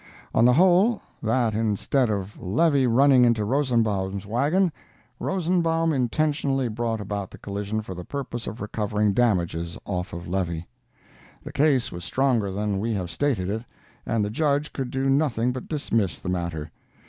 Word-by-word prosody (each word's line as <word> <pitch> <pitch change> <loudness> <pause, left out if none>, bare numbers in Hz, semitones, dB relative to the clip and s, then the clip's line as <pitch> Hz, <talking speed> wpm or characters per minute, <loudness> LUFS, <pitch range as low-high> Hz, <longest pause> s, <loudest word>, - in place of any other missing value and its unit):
On 115 - +4
the 125 - +6
whole, 185 - +4 0.2
that 115 0 +1
instead 115 +4 +1
of 100 -1 -4
Levy 135 - +2
running 130 +2 +5
into 115 -3 +3
Rosenbaum's 105 -7 0
wagon, 150 - +2 0.5
Rosenbaum 165 -3 +1
intentionally 135 0 0
brought 115 0 -2
about 100 -1 -4
the - - -12
collision 100 +2 -4
for 95 - -7
the 90 0 -7
purpose 120 -1 -5
of 115 - -6
recovering 105 -1 0
damages 85 -7 0
off 90 -2 -3
of 85 +1 -7
Levy. 85 -2 -2 0.8
The - - -8
case 135 -4 +2
was 85 0 -7
stronger 125 -6 +1
than 100 0 -1
we 110 +2 -1
have 90 -3 -3
stated 110 -3 0
it, 110 +3 -2 0.4
and 110 -2 0
the 105 - -3
Judge 145 +3 0
could 130 -3 -3
do 135 +1 -1
nothing 135 -4 +2
but 130 0 -6
dismiss 115 - -1
the 90 - -5
matter. 85 -4 -3
115 Hz, 160 wpm, -25 LUFS, 100-140 Hz, 0.8 s, the